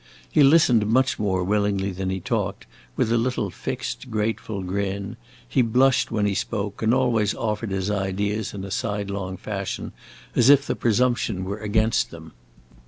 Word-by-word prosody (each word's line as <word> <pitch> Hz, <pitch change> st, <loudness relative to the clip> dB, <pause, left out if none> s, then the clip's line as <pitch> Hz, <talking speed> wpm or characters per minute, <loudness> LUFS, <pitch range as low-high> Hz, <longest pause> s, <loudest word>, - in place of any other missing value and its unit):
He -, -, +4 dB
listened 135 Hz, -7 st, +5 dB
much 130 Hz, +4 st, +2 dB
more 95 Hz, -3 st, 0 dB
willingly 100 Hz, 0 st, 0 dB
than 95 Hz, +1 st, -3 dB
he 95 Hz, 0 st, -2 dB
talked, 75 Hz, -, -2 dB, 0.3 s
with 110 Hz, -, +1 dB
a 115 Hz, -, +3 dB
little 115 Hz, -5 st, -1 dB
fixed, 125 Hz, -, -5 dB
grateful 110 Hz, -2 st, -2 dB
grin; 100 Hz, +3 st, -3 dB, 0.3 s
he 130 Hz, -, +2 dB
blushed 130 Hz, +3 st, +3 dB
when 105 Hz, -2 st, 0 dB
he 100 Hz, -, +1 dB
spoke, 100 Hz, 0 st, -3 dB
and 110 Hz, 0 st, +3 dB
always 120 Hz, -5 st, +2 dB
offered 110 Hz, -1 st, -2 dB
his 95 Hz, +1 st, -1 dB
ideas 100 Hz, +1 st, -1 dB
in 95 Hz, -, -5 dB
a 100 Hz, -, -8 dB
sidelong 100 Hz, -3 st, -3 dB
fashion, 100 Hz, 0 st, -4 dB, 0.4 s
as 120 Hz, +2 st, +5 dB
if 140 Hz, 0 st, +6 dB
the -, -, -1 dB
presumption 120 Hz, -4 st, +1 dB
were 100 Hz, +3 st, -4 dB
against 110 Hz, +2 st, +1 dB
them. 80 Hz, -1 st, -11 dB
105 Hz, 165 wpm, -24 LUFS, 100-115 Hz, 0.4 s, if